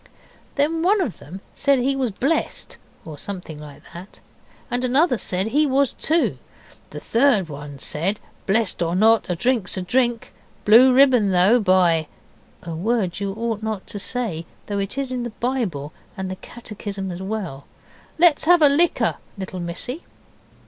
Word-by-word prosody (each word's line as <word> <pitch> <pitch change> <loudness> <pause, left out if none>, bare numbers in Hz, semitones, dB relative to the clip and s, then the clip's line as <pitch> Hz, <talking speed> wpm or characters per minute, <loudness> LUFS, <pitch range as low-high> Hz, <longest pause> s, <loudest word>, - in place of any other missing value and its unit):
Then 310 +3 +1
one 400 +5 +3
of 280 - -2
them 185 +7 -10
said 280 -1 +2
he 265 +2 +1
was 260 -3 0
blessed, 270 +10 -2 0.3
or 155 -3 -9
something 180 -6 -7
like 150 -2 -12
that, 180 +4 -11 0.5
and 245 +1 -1
another 255 0 +2
said 190 +4 -1
he 295 +5 +2
was 275 0 +2
too. 325 +2 0 0.5
The - - -8
third 230 -8 +2
one 145 -1 -8
said, 175 +9 -2 0.3
'Blessed 210 -2 +1
or 170 0 0
not, 220 +2 +4
a 180 - 0
drink's 220 0 0
a - - -2
drink. 240 +3 0 0.3
Blue 235 +5 +7
ribbon, 250 -5 +5
though, 190 +6 +4
by 180 -6 +3 0.3
' - - -31
(a 170 - -6
word 195 +1 -1
you 200 -1 -3
ought 225 -1 -3
not 220 -3 -4
to 205 - -6
say, 200 -9 -3 0.2
though 205 -1 -3
it 195 +6 -4
is 275 -2 -2
in 250 -1 -2
the 240 -2 -6
Bible 205 - -2 0.2
and 190 -1 -4
the - - -4
catechism 205 -4 -7
as 175 +1 -7
well). 190 -9 -5 0.5
'Let's 330 -3 +4
have 350 -1 +5
a 290 - +7
liquor, 325 +5 +2 0.2
little 190 -1 -6
missy. 180 - -5
215 Hz, 170 wpm, -22 LUFS, 185-260 Hz, 0.5 s, Blue